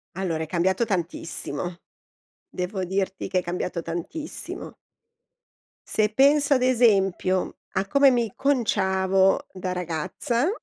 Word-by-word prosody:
Allora, 170 -4 -2
è - - -3
cambiato 185 +6 +1
tantissimo. 175 -4 -2 0.7
Devo 185 +1 -3
dirti 190 +1 -2
che 185 - +2
è - - -2
cambiato 175 0 -3
tantissimo. 175 - -5 1.1
Se 215 -1 +2
penso 280 +5 +4
ad 255 - +2
esempio 195 -7 +2 0.2
a 190 +1 -1
come 280 +5 +5
mi 235 -4 0
conciavo 195 -3 +2
da 185 -1 -4
ragazza, 180 - -1
190 Hz, 115 wpm, -25 LUFS, 180-235 Hz, 1.1 s, come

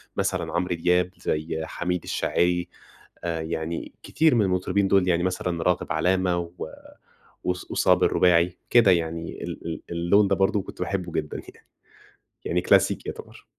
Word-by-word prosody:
مثلًا - - -1
عمرو 90 +1 0
دياب، 90 +2 +2
زي 80 +1 -2
حميد 90 +1 -3
الشاعري 90 0 0 0.6
آآ 85 -2 -2
يعني 80 +1 -4
كتير 160 -4 +2
من 115 - +4
المطربين 95 +2 +1
دول 95 -1 +3
يعني 85 0 +2
مثلًا 90 -2 -2
راغب 90 -1 0
علامة 90 +2 +1
و 85 -1 -6 0.8
وص 90 0 -3
وصابر - - +3
الرباعي 90 0 +3
كده 115 -5 +6
يعني 85 -1 -1
ال - - -7
ال 80 -2 -5
اللون 85 +4 +3
ده 100 - +2
برضو 95 +1 +2
كنت - - -11
باحبّه 90 -2 -3
جدًا 75 -2 -3
يعني، - - -23 0.8
يعني 90 +1 0
كلاسيكي - - +2
يعتبر. - - -9
90 Hz, 150 wpm, -25 LUFS, 85-95 Hz, 0.8 s, كده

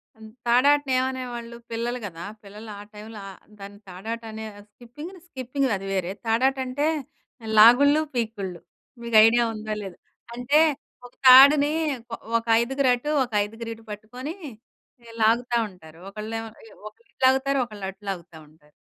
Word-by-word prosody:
హ్మ్, 220 0 -13 0.2
తాడాటని 275 +3 +3
ఏమనేవాళ్ళు? 245 -3 -4
పిల్లలు 240 +2 -3
గదా, 170 -3 -8 0.2
పిల్లలు 210 +2 -11
ఆ - - -8
టైమ్‌లో 210 +1 -10
ఆహ్, 190 - -11 0.2
దాన్ని 200 +1 -11
తాడాట 220 +6 -6
అనే 220 0 -7 0.3
స్కిపింగ్‌ని, 295 - -11
స్కిపింగ్ 265 -1 -2
అది 195 0 -6
వేరే. 185 -2 -1
తాడాటంటే 260 +5 0 0.7
లాగుళ్ళు, 285 +7 +7
పీకుళ్ళు. 205 -7 -3 0.4
మీకు 230 -2 +2
ఐడియా 235 +1 +4
ఉందా 215 0 -5
లేదా? 190 -3 -8 0.4
అంటే 245 +5 +2 0.5
ఒక 245 - -14
తాడుని 280 +3 +8 0.4
కొ 230 - -4 0.2
ఒక 230 - -5 0.2
ఐదుగురు 270 +2 0
అటు, 295 +5 -4
ఒక 240 - -8
ఐదుగురు 225 +2 -7
ఇటు 225 - -16
పట్టుకొని 250 - -7 0.7
ఈ - - -15 0.2
లాగుతావుంటారు. 220 -8 -1
ఒక్కలేమో 225 +2 -6 0.2
ఇ - - -15 0.2
ఒకళ్ళు 225 +2 -31
ఇటు - - -29
లాగుతారు, 270 +1 +2
ఒకళ్ళు 210 -4 -9
అటు 195 +1 -13
లాగుతా 175 -3 -7
ఉంటారు. 150 -1 -26
230 Hz, 145 wpm, -24 LUFS, 210-260 Hz, 0.7 s, తాడుని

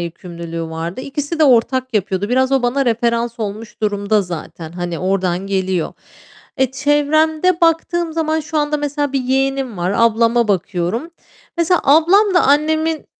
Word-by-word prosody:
yükümlülüğü 170 -1 -6
vardı. 165 +5 -5
İkisi 290 +4 -4
de 315 - +5
ortak 255 0 +2
yapıyordu. 195 -1 -1
Biraz 260 +2 +1
o 270 -2 +2
bana 255 +3 +1
referans 235 0 -1
olmuş 215 +1 -6
durumda 205 0 +1
zaten, 165 -2 -8
hani, 175 -1 -4
oradan 185 0 -1
geliyor. 190 -3 -1 0.7
Eee, 265 -1 +2
çevremde 310 +5 +1
baktığım 335 0 +1
zaman 315 0 0
şu 305 +1 -3
anda 295 0 0
mesela 290 -1 -2
bir 275 - 0
yeğenim 270 -2 -1
var, 180 +3 -1
ablama 230 0 +3
bakıyorum. 195 - -1 0.5
Mesela 340 +1 +2
ablam 350 +8 +4
da 355 - +5
annemin 315 +3 +1
250 Hz, 145 wpm, -18 LUFS, 195-300 Hz, 0.7 s, de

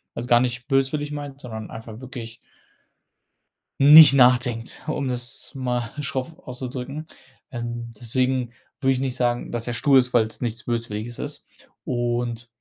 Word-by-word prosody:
Also, 120 - -4
gar 120 - +6
nicht 125 0 -2
böswillig 140 +2 +1
meint, 145 -2 -7
sondern 110 -3 -7
einfach 110 0 -9
wirklich 120 -3 -8 1.5
nicht 150 +2 +10
nachdenkt, 125 -3 +3
um 145 -3 -1
das 125 -1 -3
mal 125 -3 -2
schroff 140 +3 -4
auszudrücken, 130 +4 -6 0.4
ähm, 120 -1 -5
deswegen 125 +1 0 0.3
würde 135 -1 +2
ich 130 - -1
nicht 130 -2 -2
sagen, 120 -1 0
dass 120 -1 -3
er 120 - -2
stur 135 +3 +3
ist, 125 -1 +1
weil's 110 0 +1
nichts 115 -2 -3
Böswilliges 115 -1 -4
ist - - -6 0.4
und 120 -1 -2
125 Hz, 145 wpm, -23 LUFS, 120-135 Hz, 1.5 s, nicht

